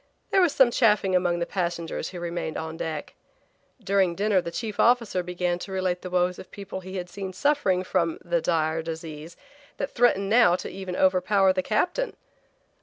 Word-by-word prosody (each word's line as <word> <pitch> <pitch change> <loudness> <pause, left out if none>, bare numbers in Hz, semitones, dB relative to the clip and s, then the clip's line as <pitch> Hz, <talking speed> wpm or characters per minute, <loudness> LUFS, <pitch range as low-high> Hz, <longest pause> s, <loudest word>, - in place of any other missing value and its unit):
There 385 - +4
was 350 -4 +4
some 265 -4 +4
chaffing 210 -6 +3
among 175 -1 +2
the 170 - -1
passengers 170 -4 -3
who 180 - -8
remained 170 -2 -4
on 160 0 -5
deck. 160 -2 -5 0.7
During 195 -4 +1
dinner 200 -1 +2
the 170 - -5
chief 215 +4 -5
officer 230 -6 +3
began 180 0 -2
to 195 - -8
relate 185 -1 -1
the 185 - -6
woes 180 0 +1
of - - -11
people 195 -2 -7
he 185 +1 -9
had 180 -1 -4
seen 190 +1 -6
suffering 205 -10 +1
from 170 -3 0
the 170 -1 +1
dire 160 -1 0
disease 160 0 -7 0.4
that 280 - -3
threatened 230 -5 +2
now 210 -5 +5
to - - -5
even 190 -1 -6
overpower 190 +1 +3
the 185 - 0
captain. 355 - -1
185 Hz, 180 wpm, -26 LUFS, 175-200 Hz, 0.7 s, now